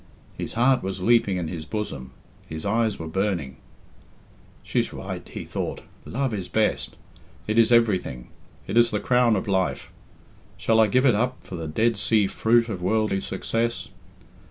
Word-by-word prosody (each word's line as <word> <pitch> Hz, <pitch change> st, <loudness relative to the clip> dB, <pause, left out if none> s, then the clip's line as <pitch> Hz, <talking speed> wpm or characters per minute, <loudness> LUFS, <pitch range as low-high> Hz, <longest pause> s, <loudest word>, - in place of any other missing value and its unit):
His -, -, -5 dB
heart 125 Hz, +2 st, +3 dB
was 95 Hz, -1 st, -4 dB
leaping 115 Hz, -3 st, +3 dB
in 85 Hz, -2 st, -2 dB
his 80 Hz, -1 st, -5 dB
bosom; 80 Hz, -9 st, -5 dB, 0.4 s
his 80 Hz, +2 st, -6 dB
eyes 110 Hz, +1 st, +1 dB
were 80 Hz, -, -6 dB
burning. 85 Hz, -6 st, -2 dB, 1.1 s
"She's -, -, -1 dB
right," -, -, -7 dB
he -, -, -6 dB
thought. -, -, -4 dB, 0.2 s
"Love 135 Hz, -1 st, -2 dB
is 95 Hz, -4 st, -4 dB
best. 110 Hz, -1 st, 0 dB, 0.5 s
It 110 Hz, +2 st, +1 dB
is 115 Hz, +1 st, +5 dB
everything. 100 Hz, -, +2 dB, 0.4 s
It 115 Hz, -, -2 dB
is 120 Hz, 0 st, +6 dB
the 105 Hz, -, -1 dB
crown 125 Hz, -2 st, +3 dB
of 95 Hz, -, -2 dB
life. 95 Hz, -2 st, -1 dB, 0.7 s
Shall 110 Hz, 0 st, +2 dB
I 110 Hz, -, +6 dB
give 130 Hz, +6 st, +2 dB
it 125 Hz, -, +6 dB
up 125 Hz, +5 st, -1 dB
for -, -, -11 dB
the 80 Hz, -2 st, -5 dB
Dead 110 Hz, +8 st, +1 dB
Sea 105 Hz, +1 st, +2 dB
fruit 115 Hz, +4 st, +2 dB
of 100 Hz, -6 st, -5 dB
worldly 105 Hz, 0 st, +1 dB
success? 115 Hz, +3 st, -2 dB
110 Hz, 165 wpm, -25 LUFS, 95-115 Hz, 1.1 s, is